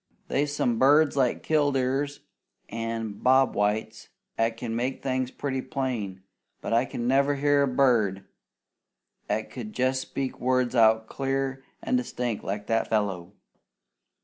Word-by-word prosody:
They's 145 +1 0
some 120 -5 0
birds 145 +3 +5
like 130 -3 +1
killdeers 145 -1 0 0.5
an' 115 -2 -4
bobwhites 110 -4 +2 0.3
'at 115 0 0
can 115 -1 -4
make 125 +3 -2
things 130 -1 -1
pretty 135 -1 -3
plain, 120 -10 -4 0.4
but - - -3
I 120 +3 +3
never 135 +4 +2
heard 140 0 +2
a - - -5
bird 110 -8 +2 1.0
'at 110 +1 -2
could 110 -4 -7
jest 130 +1 +1
speak 135 0 -4
words 125 -1 +1
out 110 -2 +4
clear 135 +1 -2 0.2
an' 255 - +1
distinct 125 - -3
like 105 +1 -4
that 115 +1 0
fellow. 100 -5 -1
125 Hz, 130 wpm, -26 LUFS, 110-135 Hz, 1.0 s, birds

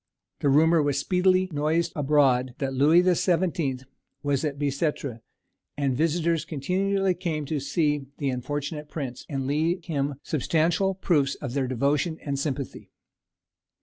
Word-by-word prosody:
The 145 - +1
rumour 160 +3 +5
was 145 -2 0
speedily 185 +4 +2
noised 155 +3 0
abroad 135 -4 +2
that 135 -3 -2
"Louis 150 +6 +5
the 180 0 +3
Seventeenth" 165 -7 0 0.4
was 145 -1 0
at 145 -2 -2
Bicêtre, 140 -3 -2 0.6
and 140 -3 0
visitors 165 +2 +1
continually 185 +5 0
came 165 -4 -3
to 150 +1 -2
see 145 0 0
"the 140 -2 -1
unfortunate 145 +4 -4
prince," 130 -6 -6
and 135 -2 -2
leave 160 +5 0
him 145 -3 -1
substantial 165 +6 +1
proofs 145 -7 +1
of 135 -5 -6
their 135 -2 0
devotion 140 +6 0
and 140 -2 -2
sympathy. 140 -2 -4
150 Hz, 140 wpm, -26 LUFS, 140-165 Hz, 0.6 s, rumour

